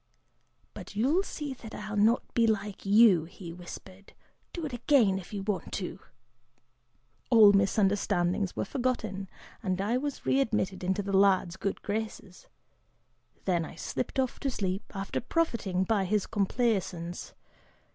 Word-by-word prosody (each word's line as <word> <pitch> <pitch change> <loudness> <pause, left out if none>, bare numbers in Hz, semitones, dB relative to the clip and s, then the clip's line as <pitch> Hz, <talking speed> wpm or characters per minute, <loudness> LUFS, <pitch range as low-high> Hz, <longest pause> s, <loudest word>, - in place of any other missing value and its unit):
'But - - -10
you'll 275 - +3
see 295 -7 -5
that 225 -3 -10
I'll 210 0 -5
not 220 +4 +4
be 230 -1 +3
like 205 -2 -2
you,' 200 -5 +6
he 170 0 -9
whispered; 185 +2 -11 0.4
'do 340 -3 -5
it 285 - -5
again, 235 -6 +3
if 180 - -12
you 200 -2 -4
want 205 -1 -3
to!' - - -4 1.3
All 215 -4 +8
misunderstandings 195 -2 +1
were - - -1
forgotten 220 -6 -2 0.3
and 185 -2 -1
I 215 +5 +1
was 285 +1 -4
readmitted 215 -8 +1
into 190 +2 0
the 195 0 -1
lad's 190 -3 +4
good 195 +1 -3
graces. 210 -3 -5 1.0
Then 175 -3 +1
I - - -8
slipped 265 - -3
off 260 -2 -1
to 275 - -1
sleep, 195 -5 -3
after 195 0 -3
profiting 230 - 0
by 200 0 +1
his 205 +1 +1
complaisance. 195 -5 -1
205 Hz, 140 wpm, -29 LUFS, 190-230 Hz, 1.3 s, All